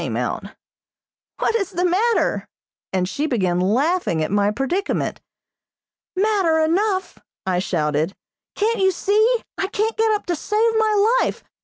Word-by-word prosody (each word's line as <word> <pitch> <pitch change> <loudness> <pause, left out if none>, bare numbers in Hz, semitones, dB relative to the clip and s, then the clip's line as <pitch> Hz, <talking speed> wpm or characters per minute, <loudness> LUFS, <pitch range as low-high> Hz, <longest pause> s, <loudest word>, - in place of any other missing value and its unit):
came - - -3
out. - - -2 0.9
"What - - 0
is 400 -5 0
the 360 -1 -1
matter?" 425 +7 +1 0.4
and 185 -1 0
she 290 +10 -2
began 185 - 0
laughing 230 - +1
at - - -3
my 205 0 +2
predicament. 270 - -2 0.9
"Matter 385 -5 +2
enough!" 375 +5 0 0.3
I 185 -1 +1
shouted. 155 -1 -1 0.4
"Can't 445 +2 0
you 380 0 +4
see? 435 +6 +2 0.2
I 385 - 0
can't 435 +2 -1
get 445 0 +3
up 420 - -2
to 350 - -1
save 430 +8 +1
my 435 +2 +3
life. - - -2
370 Hz, 145 wpm, -21 LUFS, -, 0.9 s, you